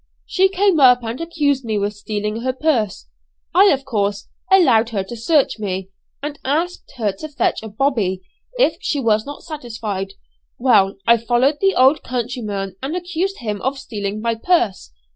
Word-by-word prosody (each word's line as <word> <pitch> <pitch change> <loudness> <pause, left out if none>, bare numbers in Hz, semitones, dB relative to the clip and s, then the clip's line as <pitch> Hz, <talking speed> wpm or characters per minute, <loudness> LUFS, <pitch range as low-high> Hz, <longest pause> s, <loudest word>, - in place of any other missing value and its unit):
She 380 +1 +3
came 390 -3 +2
up 250 -2 +6
and 230 +5 -4
accused 290 -5 0
me 220 -2 -2
with 205 +1 -1
stealing 210 +1 -3
her 255 +1 -1
purse. 245 - -1 0.5
I, 380 +4 +6
of 275 -8 +3
course, 205 -5 -2 0.2
allowed 235 -12 +5
her 205 -4 -2
to 215 +5 -8
search 265 +1 +1
me, 190 -2 -3 0.3
and 290 0 -5
asked 325 +6 -2
her 215 -4 0
to 250 +11 -9
fetch 285 - 0
a 220 - -7
'bobby,' 210 -6 0 0.3
if - - +3
she 290 - -1
was 220 -3 +1
not 290 - -8
satisfied. 220 - -5 0.4
Well, 210 -6 +3
I 235 0 +6
followed 245 +5 +1
the 390 0 +3
old 265 +4 +5
countryman 220 -6 -4
and 275 +6 -3
accused 360 0 -3
him 210 -3 -3
of 270 +2 -1
stealing 210 -5 -5
my 230 0 0
purse. 225 - 0
240 Hz, 170 wpm, -20 LUFS, 210-295 Hz, 0.5 s, up